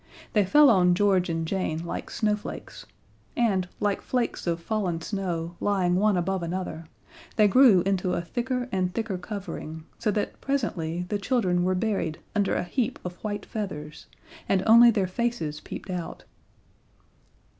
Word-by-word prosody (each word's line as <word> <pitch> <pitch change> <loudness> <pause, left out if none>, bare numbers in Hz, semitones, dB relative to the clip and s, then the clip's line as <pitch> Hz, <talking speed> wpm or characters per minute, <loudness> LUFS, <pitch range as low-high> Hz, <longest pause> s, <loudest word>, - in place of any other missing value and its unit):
They 210 -3 +4
fell 295 +6 +6
on 180 -3 +4
George 190 -2 +2
and 165 -1 -2
Jane 170 -3 -2
like - - -5
snowflakes, 210 -2 -3 0.5
and, 195 -6 +1
like 205 -1 0
flakes 245 -7 -2
of 170 0 0
fallen 180 -2 -1
snow 175 -3 -3
lying 185 -3 +1
one 205 0 +3
above 185 +1 -1
another, 170 -1 -4 0.5
they 210 -1 +5
grew 225 -4 +6
into 185 -1 0
a - - 0
thicker 250 +6 -2
and 185 -1 0
thicker 220 -5 -2
covering, 180 -5 -6
so - - 0
that 205 0 -2
presently 180 - -2
the 205 - -1
children 195 -6 +1
were 185 +1 +1
buried 190 -6 -1 0.2
under 205 -2 +1
a - - 0
heap 240 +7 -1
of 180 0 -5
white 205 -2 -3
feathers, 150 -9 -6 0.4
and 190 -1 +2
only 235 +2 +8
their 205 -4 +2
faces 185 -6 -2
peeped 185 - -8
out. 175 -2 -5
190 Hz, 155 wpm, -26 LUFS, 175-215 Hz, 0.5 s, only